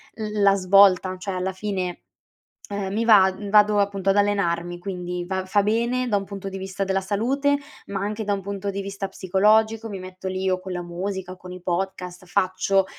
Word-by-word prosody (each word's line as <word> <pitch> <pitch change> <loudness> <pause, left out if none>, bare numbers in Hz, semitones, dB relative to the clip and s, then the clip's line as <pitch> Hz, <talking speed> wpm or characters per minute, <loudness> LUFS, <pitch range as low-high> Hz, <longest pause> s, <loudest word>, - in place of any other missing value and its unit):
l 215 -1 -3
la 200 0 +6
svolta, 190 -1 +5
cioè 190 +1 -5
alla 185 +1 -1
fine, 185 -3 -3 0.7
ehm, 200 -1 -3
mi 225 +2 0
vad 200 -2 +4
vado 210 0 +5
appunto 195 -1 0
ad 195 - +2
allenarmi, 175 -4 +1
quindi 180 -1 -4
va 190 0 -2
fa 205 +1 +2
bene 235 +4 0
da 210 - +2
un 200 - -1
punto 195 0 -7
di 195 - -6
vista 190 0 -3
della 195 0 0
salute, 265 +9 +1 0.3
ma 200 -1 -4
anche 210 +2 -3
da 205 - 0
un 200 - -1
punto 200 +1 -4
di 200 0 -4
vista 195 0 -5
psicologico, 215 +4 +2
mi 200 -3 -6
metto 185 0 -7
lì 185 0 -2
o 185 0 +1
co 190 +1 -8
la 180 -1 -3
musica, 185 +2 -5
o - - -10
con 180 0 -10
i 180 - -9
podcast, 180 0 -3
faccio, 195 +1 +1
195 Hz, 205 wpm, -24 LUFS, 185-205 Hz, 0.7 s, la